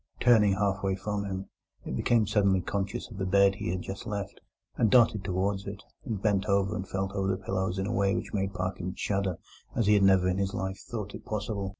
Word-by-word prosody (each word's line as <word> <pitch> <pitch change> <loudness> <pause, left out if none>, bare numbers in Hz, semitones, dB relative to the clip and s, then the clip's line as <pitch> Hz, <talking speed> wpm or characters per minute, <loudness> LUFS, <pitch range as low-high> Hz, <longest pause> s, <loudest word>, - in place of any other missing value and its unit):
Turning 110 -5 +5
half 95 0 0
away 95 -1 0
from 100 +1 -3
him, 95 -1 -4 0.4
it - - -3
became 115 - +3
suddenly 100 -2 +3
conscious 100 +5 -3
of 105 - -9
the - - -1
bed 100 +1 +5
he 95 - -4
had 90 0 -2
just 95 +4 -6
left, 100 -2 -5 0.3
and 110 - +3
darted 110 -3 +5
towards 95 +1 -1
it, 100 +1 -7 0.2
and 110 -6 -4
bent 100 -3 +2
and 100 0 0
felt 95 0 -2
over 95 -1 -1
the 95 -1 +1
pillows 95 0 -2
in 95 - -1
a 110 - -2
way 100 0 +2
which - - -4
made 95 -1 0
Parkins 95 -1 -4
shudder 100 -3 -1 0.4
as 115 -4 +1
he 105 - +5
had 100 - +5
never 95 -1 +5
in 90 +1 0
his 95 0 -1
life 95 0 -3
thought 105 -4 -5
it - - -9
possible. 105 -2 -3
100 Hz, 225 wpm, -29 LUFS, 95-105 Hz, 0.4 s, Turning